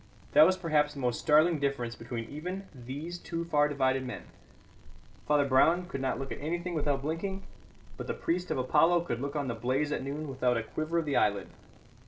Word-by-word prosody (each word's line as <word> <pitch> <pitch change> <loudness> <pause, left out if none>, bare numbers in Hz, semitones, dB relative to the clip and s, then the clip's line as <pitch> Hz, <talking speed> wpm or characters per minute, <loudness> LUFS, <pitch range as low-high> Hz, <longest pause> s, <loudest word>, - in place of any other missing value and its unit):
That 155 - +8
was 185 0 +2
perhaps 150 -5 +1
the - - -7
most 125 -2 0
startling 155 +2 +4
difference 135 -5 -1
between 115 -1 -6
even 180 +8 -6
these 145 +7 -6
two 170 -1 -4
far 150 -3 +3
divided 135 -2 +1
men. 125 - -6 1.0
Father 150 -1 +4
Brown 160 +7 +4
could 135 - -5
not 130 - 0
look 135 0 -6
at - - -5
anything 175 +4 -2
without 145 -3 0
blinking; 190 +6 -3 0.5
but - - -6
the - - -2
priest 180 +2 -2
of - - -1
Apollo 165 +7 +4
could 125 -8 -3
look 140 +2 -4
on 145 -2 -1
the 120 - -1
blaze 130 +6 -1
at - - -1
noon 145 +3 -4
without 125 -3 +1
a 115 - -1
quiver 155 +7 -3
of 165 - +1
the 145 - +1
eyelid. 100 -1 +1
145 Hz, 205 wpm, -30 LUFS, 130-165 Hz, 1.0 s, That